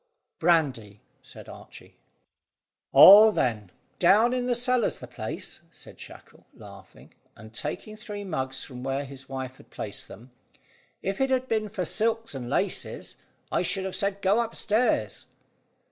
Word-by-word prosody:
"Brandy," 135 - +1 0.2
said - - -13
Archy. - - -13 1.0
"Oh, 210 +3 +10
then, 110 - -1 0.3
down 215 +7 +4
in 250 -1 -1
the 245 - +1
cellar's 245 -1 0
the - - -9
place," 120 -3 -7
said - - -15
Shackle, - - -14
laughing, 100 -3 -15 0.2
and 110 +1 -14
taking 150 - -5
three 210 -1 -8
mugs 135 -8 -4
from 125 -2 -10
where 135 +2 -2
his 135 0 -12
wife 130 -1 -6
had - - -19
placed 100 -1 -6
them. 120 +5 -14 0.7
"If 195 +6 -3
it 270 - +2
had 260 -1 0
been 215 -2 -1
for 190 -3 -3
silks 225 +3 -1
and 125 -3 -6
laces, - - -3 0.3
I - - +1
should 190 +2 -2
have 190 - -4
said 200 0 -2
go 200 +5 +3
upstairs." 230 0 -1
180 Hz, 145 wpm, -26 LUFS, -, 1.0 s, Oh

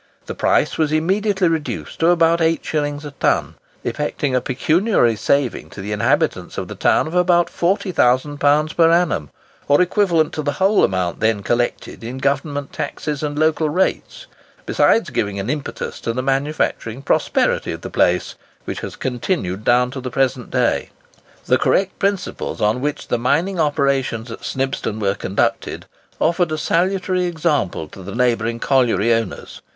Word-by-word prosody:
The - - -5
price - - +1
was 155 -2 +2
immediately 190 +4 +1
reduced 160 -2 -3
to 165 - +3
about 170 -1 +4
8s. 150 -3 -1
a 145 - -6
ton, 140 - 0 0.3
effecting 150 -2 -2
a 125 - +2
pecuniary 140 - +2
saving 130 +4 0
to - - -11
the 100 +2 -5
inhabitants 105 -1 0
of - - -3
the - - -6
town - - +2
of 155 - -6
about 175 -1 +3
£40,000 150 -4 +1
per 165 -1 +5
annum, 165 - +1 0.4
or 145 - +4
equivalent 180 -4 +2
to 155 - -2
the 145 -1 -1
whole 195 +2 +3
amount 90 -2 0
then 110 -2 +1
collected 120 +1 -2
in 120 +3 -5
Government 140 +1 -2
taxes 150 -2 -4
and 145 -1 -3
local 155 0 +2
rates, 180 +5 -1 0.4
besides 225 - +2
giving 100 -1 -1
an 100 +6 -2
impetus 150 -2 -5
to 115 - -2
the 130 +2 -2
manufacturing 135 -3 -1
prosperity - - +1
of - - -6
the - - -7
place, 90 0 +1 0.3
which - - -4
has - - -6
continued 120 - -2
down 125 +1 +3
to 130 0 -6
the 125 - -4
present 130 -1 -1
day. - - 0 0.6
The - - +3
correct 195 0 +1
principles 200 -1 -2
upon 105 +4 +1
which 145 +1 -3
the 120 - 0
mining 160 +10 +1
operations 140 -6 0
at - - -9
Snibston 135 -5 -2
were 100 -2 +1
conducted 100 -1 -2 0.3
offered 170 0 +1
a 155 - -1
salutary 185 +3 0
example 155 - -1
to 95 - -12
the 100 +3 -7
neighbouring 115 -2 +1
colliery 120 -5 +2
owners. 115 -3 -4
145 Hz, 160 wpm, -20 LUFS, 120-165 Hz, 0.6 s, per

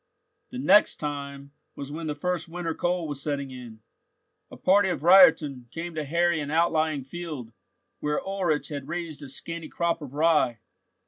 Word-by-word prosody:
The 255 - -7
"next 210 -5 +5
time" 140 -1 -6 0.2
was 140 0 -7
when 160 +1 -5
the 150 - -2
first 180 +3 -2
winter 170 -1 -3
cold 175 -1 -1
was 145 -2 -5
setting 140 -2 -3
in. 120 -4 -10 0.7
A - - -11
party 195 +1 +4
of 175 -4 -3
reitern 160 -9 +6
came 170 +4 -6
to 155 -1 -3
harry 170 +2 +1
an 145 -1 -4
outlying 155 -2 +1
field, 145 -6 -7 0.5
where 150 0 -1
Ulrich 185 -6 -1
had 140 -3 -6
raised 170 -3 -5
a 140 - -8
scanty 165 +4 -6
crop 170 -1 -1
of 140 -2 -9
rye. 155 -6 +3
155 Hz, 170 wpm, -26 LUFS, 140-175 Hz, 0.7 s, reitern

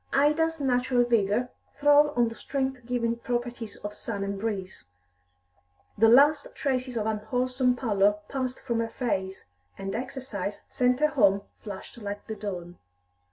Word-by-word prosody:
Ida's 310 +3 +3
natural 250 -2 +2
vigour 235 0 +1 0.3
throve 290 0 +4
on 240 -1 +4
the 230 - -5
strength 265 -1 -3
giving 235 -2 0
properties 240 -2 -3
of 205 - -4
sun 205 -2 -4
and 200 0 -3
breeze 195 -3 -4 1.1
the 225 +2 +5
last 285 +4 +5
traces 255 -3 -1
of 215 - -1
unwholesome 250 +4 0
pallor 205 -5 +2
passed 260 -2 -3
from 235 -3 -1
her 230 0 -1
face, 190 -6 -2 0.3
and 195 0 -4
exercise 230 -6 -4
sent 250 +2 +2
her 305 - +5
home 200 -8 +3 0.2
flushed 205 +3 -8
like 205 -1 -6
the 220 - -5
dawn. 180 -5 -6
240 Hz, 145 wpm, -27 LUFS, 205-260 Hz, 1.1 s, the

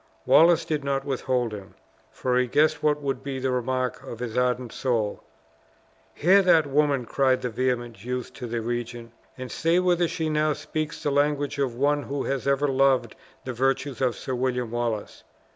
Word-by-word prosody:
Wallace 165 0 +5
did 150 -2 -2
not 135 -1 -1
withhold 130 -4 -1
him, 100 -2 -9 0.4
for 125 -1 -1
he 125 - +1
guessed 150 +6 +2
what 150 -1 +1
would 135 -2 -2
be 135 0 -4
the 130 0 -1
remark 125 0 -1
of 115 - -8
his 115 -1 -5
ardent 125 -1 0
soul. 115 -5 -1 0.9
"Hear 190 +6 +5
that 165 -5 +4
woman!" 140 -2 +1
cried 130 +1 +1
the 125 - -2
vehement 120 -3 -2
youth 125 0 -4
to 125 - -7
the 115 0 -3
regent, 120 0 -5 0.2
"and 130 -1 -7
say 165 +1 +1
whether 175 -1 +2
she 165 -1 -3
now 155 0 +1
speaks 155 +1 -5
the 145 - 0
language 145 0 0
of 130 -4 0
one 145 +3 +1
who 140 0 -4
had 135 0 -2
ever 140 +1 +2
loved 135 -4 +2 0.3
the 130 - -4
virtues 135 +1 -1
of 125 -3 +1
Sir 130 - -5
William 125 -2 -1
Wallace? 115 -3 -3
130 Hz, 180 wpm, -25 LUFS, 125-145 Hz, 0.9 s, Wallace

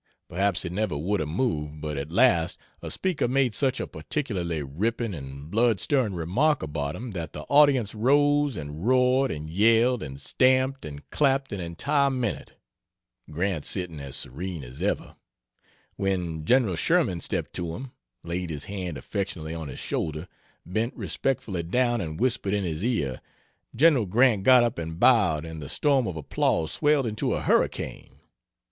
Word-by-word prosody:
Perhaps 100 +1 0
he 90 - -3
never 95 -3 -1
would 95 +7 -1
have 75 - -2
moved, 75 - -2
but 75 0 -4
at 70 +3 -5
last 90 -5 +3 0.2
a - - -6
speaker 185 -9 -1
made 130 -2 +2
such 135 0 0
a - - -2
particularly 90 - -3
ripping 110 - -2
and 70 0 -8
blood 115 -2 +3
stirring 125 -4 +1
remark 100 - +1
about 75 -1 -3
him 120 0 -6
that 85 -5 -5
the 75 - -6
audience 140 - +4
rose 145 +4 +3
and 75 +5 -6
roared 130 +1 +3
and 75 0 -5
yelled 115 +7 +3
and 70 -2 -7
stamped 130 - +2
and 70 -1 -9
clapped 135 -4 +1
an 100 - -4
entire 140 - +1
minute 125 -5 -3 0.8
Grant 85 0 -1
sitting 90 -5 -2
as 70 -1 -5
serene 85 +3 -4
as 60 +1 -10
ever - - -2 0.8
when 90 -5 -2
Gen. 120 -4 +3
Sherman 100 - +1
stepped - - -3
to 85 -2 -3
him, 130 0 -8 0.3
laid 85 +1 -3
his 75 -3 -4
hand 90 -5 -5
affectionately 80 +1 -4
on 80 -2 -5
his 65 - -8
shoulder, 80 +2 -3 0.4
bent 110 +8 -2
respectfully 110 -9 -2
down 120 +7 +1
and 80 -3 -5
whispered 115 -5 +1
in 100 - -1
his 80 0 -3
ear. 75 - -1 0.5
Gen. 140 -2 +5
Grant 110 +2 +3
got 125 +4 +6
up 120 -7 -1
and 80 0 -5
bowed, 95 -12 +4
and 80 -1 -7
the 70 - -7
storm 135 - +2
of 90 -3 -4
applause 80 +1 0
swelled 145 -3 +2
into 110 -1 -1
a - - -3
hurricane. - - -1
95 Hz, 165 wpm, -26 LUFS, 80-125 Hz, 0.8 s, got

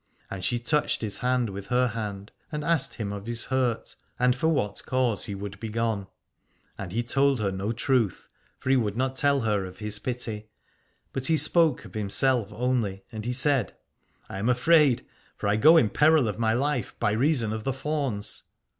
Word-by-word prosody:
And 95 -2 -5
she 120 -2 0
touched 150 +5 0
his 105 -3 -4
hand 125 -3 0
with 100 +1 -7
her 125 0 +2
hand 105 -3 -5 0.2
and 150 -1 -3
asked 165 -4 +1
him 105 -3 -4
of 100 +1 -7
his 120 0 +1
hurt, 130 -3 -1 0.2
and 125 0 +3
for 155 +5 0
what 105 - 0
cause 125 -5 +1
he 100 - -5
would 100 0 -7
be 110 0 -5
gone. 110 -3 -1 0.7
And 95 -3 -7
he 115 +4 -1
told 135 +2 +2
her 100 -2 0
no 95 +3 -3
truth, 120 -4 0 0.3
for 130 - -2
he - - +5
would 110 -4 0
not 130 +1 -1
tell 140 0 +2
her 105 -3 0
of 95 0 -9
his 105 -1 +1
pity, 110 -3 -4 0.7
but 130 -1 -3
he 160 - +3
spoke 160 -7 +3
of 95 - -13
himself 110 +2 +1
only, 110 -4 -1
and 110 -1 -6
he 125 - -1
said: 135 -4 +1 0.5
I 95 - -6
am 110 +5 0
afraid, 135 +1 +4 0.3
for - - -3
I 100 - +3
go 155 +10 +7
in 110 -10 +3
peril 150 -4 +4
of 105 +1 -4
my 110 -1 +2
life, 135 -3 -1
by 105 - +1
reason 120 -1 +1
of 110 -1 -5
the 135 - 0
fauns. 135 -6 -2
120 Hz, 200 wpm, -26 LUFS, 105-135 Hz, 0.7 s, go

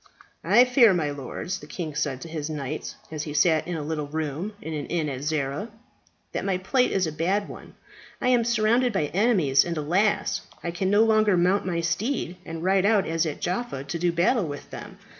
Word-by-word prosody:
"I 245 - +6
fear, 245 -5 +5
my 150 -4 0
lords," 145 +7 -5
the 150 - -12
king 155 -1 -5
said 145 -3 -2
to - - -7
his 155 -2 -4
knights 150 -1 -5 0.2
as 155 -2 -4
he 150 -1 -5
sat 155 +1 +3
in 175 - -3
a 155 - -3
little 150 -1 -3
room 160 +6 -3
in 160 - -6
an 150 -2 -4
inn 165 -3 -1
at 130 -2 -5
Zara, 150 +6 -2 0.6
"that - - -3
my 195 -2 0
plight 250 +7 +1
is 190 -2 +1
a 160 - -3
bad 190 +6 0
one. - - -11 0.4
I 250 - +1
am 245 -2 +4
surrounded 235 +1 +2
by 150 -7 -1
enemies, 180 - +4
and, 170 -1 -4
alas! 180 +8 +1 0.2
I 170 - -2
can 185 +2 -1
no 205 +2 +5
longer 215 -3 +3
mount 185 +2 +2
my 170 -2 -1
steed 180 - -1
and 165 0 -6
ride 190 +1 +3
out 205 -2 +3
as 165 0 0
at 150 - -5
Jaffa 180 - -2
to 140 +5 -5
do 175 +1 +2
battle 175 +4 +2
with 145 -1 -8
them. - - -9
170 Hz, 215 wpm, -25 LUFS, 150-205 Hz, 0.6 s, I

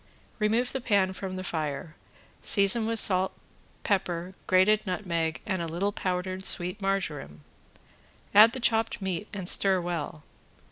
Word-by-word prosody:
Remove 225 +4 +1
the 265 - -3
pan 195 -4 +1
from 190 -1 -6
the 185 - -5
fire, 155 -1 -4 0.5
season 205 +2 +3
with 225 0 +1
salt, 190 -1 +4 0.5
pepper, 185 -4 -2
grated 200 +3 +3
nutmeg 170 -4 -2
and 190 -4 -2
a 165 - -3
little 175 +5 -2
powdered 185 0 -3
sweet 180 +1 +1
marjoram, 155 - -3 0.9
add 220 +3 +8
the 260 - -5
chopped 225 -1 +1
meat 190 0 -4
and 190 -4 -6
stir 190 0 +3
well. 165 -3 -5
190 Hz, 140 wpm, -27 LUFS, 175-210 Hz, 0.9 s, add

